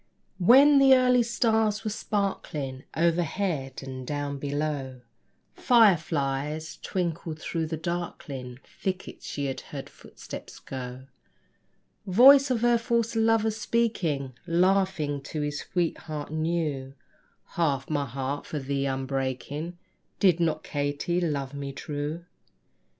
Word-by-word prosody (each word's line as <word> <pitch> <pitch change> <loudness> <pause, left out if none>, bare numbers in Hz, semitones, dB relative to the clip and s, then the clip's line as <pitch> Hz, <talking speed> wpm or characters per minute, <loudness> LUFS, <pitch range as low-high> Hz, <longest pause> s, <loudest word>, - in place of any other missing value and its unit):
When 275 +9 +7
the 270 -1 +7
early 250 -1 +4
stars 225 -2 +1
were 215 - -2
sparkling 155 -11 -3
Overhead, 165 -4 0
and 130 -1 -7
down 145 -1 -3
below 140 -3 -3 0.5
Fireflies 155 - +2
twinkled, 170 -3 -3
through 160 -1 -2
the 160 0 -3
darkling 150 -7 -5
Thickets 190 -1 -5
she 145 - -3
heard 135 +1 -8
footsteps - - -10
go 130 -1 -7 1.0
Voice 270 +8 +8
of 245 -3 0
her 240 -1 +4
false 230 -1 0
lover 225 0 +3
speaking, 210 - -1
Laughing 175 -4 +2
to 150 +2 -5
his 145 0 -2
sweetheart 155 -4 -3
new: 155 -5 -2 0.5
"Half 140 -6 0
my 145 -2 -1
heart 135 +3 -4
for 155 - -4
thee 140 0 -1
I'm 135 0 -2
breaking: 135 +5 -3 0.4
Did 180 -4 +4
not 160 -2 0
Katy 145 +5 -1
love 140 -5 -2
me 140 -1 -5
true?" 150 +4 -4
160 Hz, 115 wpm, -27 LUFS, 140-195 Hz, 1.0 s, Voice